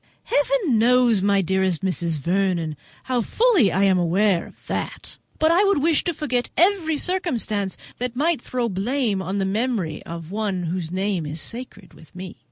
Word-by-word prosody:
"Heaven 455 Hz, -, +1 dB
knows, 240 Hz, -2 st, +4 dB
my 200 Hz, 0 st, +3 dB
dearest 190 Hz, -1 st, 0 dB
Mrs. 170 Hz, -4 st, -1 dB
Vernon, 170 Hz, -1 st, 0 dB, 0.3 s
how 255 Hz, -2 st, 0 dB
fully 380 Hz, -, +3 dB
I 195 Hz, +3 st, +1 dB
am 190 Hz, -2 st, +4 dB
aware 180 Hz, +1 st, +2 dB
of -, -, -19 dB
that; -, -, -5 dB, 0.2 s
but 315 Hz, +1 st, +3 dB
I 355 Hz, +4 st, +4 dB
would 395 Hz, -8 st, +2 dB
wish 325 Hz, -2 st, +3 dB
to 345 Hz, -, 0 dB
forget 255 Hz, -5 st, -1 dB
every 345 Hz, -4 st, +3 dB
circumstance 245 Hz, -, -1 dB, 0.2 s
that 250 Hz, 0 st, -3 dB
might 305 Hz, +1 st, +1 dB
throw 245 Hz, -1 st, -2 dB
blame 215 Hz, +1 st, -1 dB
on 190 Hz, +2 st, -3 dB
the 195 Hz, -, 0 dB
memory 200 Hz, -6 st, -1 dB
of 170 Hz, 0 st, -8 dB
one 200 Hz, -3 st, -2 dB
whose 170 Hz, -1 st, -3 dB
name 185 Hz, -3 st, -2 dB
is 150 Hz, +3 st, -5 dB
sacred 230 Hz, -1 st, -7 dB
with 160 Hz, -, -18 dB
me." 185 Hz, 0 st, -8 dB
205 Hz, 175 wpm, -23 LUFS, 185-260 Hz, 0.3 s, knows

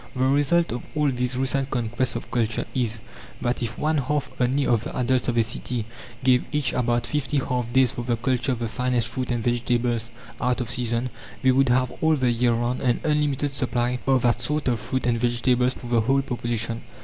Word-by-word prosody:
The 130 Hz, 0 st, +1 dB
result 145 Hz, +5 st, +3 dB
of 120 Hz, +1 st, -3 dB
all 150 Hz, -2 st, +2 dB
these 125 Hz, 0 st, -2 dB
recent 135 Hz, +1 st, +1 dB
conquests 120 Hz, 0 st, -1 dB
of -, -, -6 dB
culture 115 Hz, -2 st, 0 dB
is, 115 Hz, -4 st, -1 dB, 0.4 s
that 120 Hz, +1 st, -1 dB
if 115 Hz, -1 st, -3 dB
one 155 Hz, 0 st, +1 dB
half 145 Hz, +2 st, -1 dB
only 135 Hz, +3 st, +2 dB
of 115 Hz, -2 st, +2 dB
the -, -, -6 dB
adults 130 Hz, 0 st, +1 dB
of 120 Hz, -1 st, 0 dB
a 115 Hz, -, +5 dB
city 115 Hz, +1 st, -2 dB, 0.4 s
gave 125 Hz, -1 st, +4 dB
each 150 Hz, -2 st, 0 dB
about 120 Hz, -1 st, +1 dB
fifty 150 Hz, -1 st, -1 dB
half 125 Hz, -3 st, -1 dB
days 130 Hz, -1 st, +4 dB
for -, -, -5 dB
the 120 Hz, -1 st, 0 dB
culture 125 Hz, +2 st, 0 dB
of -, -, -3 dB
the 115 Hz, 0 st, -2 dB
finest 120 Hz, +1 st, 0 dB
fruit 125 Hz, +2 st, -4 dB
and 120 Hz, -2 st, -1 dB
vegetables 120 Hz, -1 st, 0 dB, 0.3 s
out 125 Hz, 0 st, +1 dB
of 125 Hz, -, -2 dB
season, 120 Hz, 0 st, 0 dB, 0.3 s
they 130 Hz, -, +5 dB
would 135 Hz, 0 st, +3 dB
have 125 Hz, +1 st, +2 dB
all 160 Hz, 0 st, +4 dB
the 130 Hz, -4 st, +2 dB
year 120 Hz, +1 st, +2 dB
round 120 Hz, +2 st, -1 dB
an 125 Hz, -3 st, +1 dB
unlimited 145 Hz, -2 st, +1 dB
supply 125 Hz, -1 st, 0 dB
of 130 Hz, -2 st, +3 dB
that 120 Hz, 0 st, +2 dB
sort 150 Hz, +4 st, -1 dB
of 120 Hz, -3 st, +1 dB
fruit 130 Hz, +4 st, -3 dB
and 120 Hz, -1 st, +1 dB
vegetables 125 Hz, +1 st, +2 dB
for -, -, -11 dB
the 120 Hz, -1 st, +2 dB
whole 135 Hz, +4 st, +2 dB
population. 120 Hz, -2 st, -3 dB
125 Hz, 210 wpm, -24 LUFS, 120-130 Hz, 0.4 s, a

